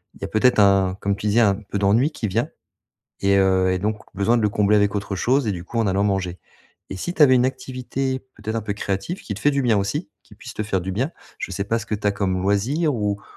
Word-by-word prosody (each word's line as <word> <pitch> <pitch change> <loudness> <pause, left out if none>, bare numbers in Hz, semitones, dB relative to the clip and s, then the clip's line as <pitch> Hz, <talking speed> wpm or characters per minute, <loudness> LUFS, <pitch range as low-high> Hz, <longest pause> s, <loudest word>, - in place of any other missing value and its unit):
il - - -19
y - - -2
a - - -4
peut-être 125 +4 +3
un 100 -2 +4
comme 100 0 0
tu 105 - -4
disais, 110 +3 +3
un 100 -3 +4
peu 100 -1 -6
d'ennui 110 +10 +3
qui 110 - -3
vient 110 +5 -1 0.7
et 100 0 +3
heu, 95 -1 +3
et 95 - 0
donc, 105 +2 -2 0.2
besoin 105 +5 +2
de - - 0
le 105 - +3
combler 105 +1 +3
avec 105 0 +2
autre 100 -1 -3
chose 125 +6 +1
et - - +1
du 85 -3 -5
coup, 115 - -5
en 110 - +2
allant 95 +1 +1
manger, 95 -3 -1 0.5
et 95 - -5
si 175 - -4
tu 165 - -1
avais 130 -3 +6
une 125 0 +4
activité, 130 0 -3 0.2
peut-être, 110 +1 -5
un 115 - -1
peu 105 -1 -3
créative, 100 - -3
qui 105 - -5
te 100 - -8
fait 145 - +3
du 140 -1 0
bien 115 -4 +3
aussi, 100 0 -2
qui - - -18
puisse - - -10
te 110 - -3
faire 95 -3 -1
du 95 - -4
bien. 130 - -1 0.3
Je - - -5
sais 100 +1 -2
pas 115 +3 -1
ce 115 - -8
que 105 - -1
tu 105 0 -9
as 100 - +3
comme 95 -2 -1
loisir, 130 - +1
ou 105 -2 -1
105 Hz, 280 wpm, -22 LUFS, 100-120 Hz, 0.7 s, avais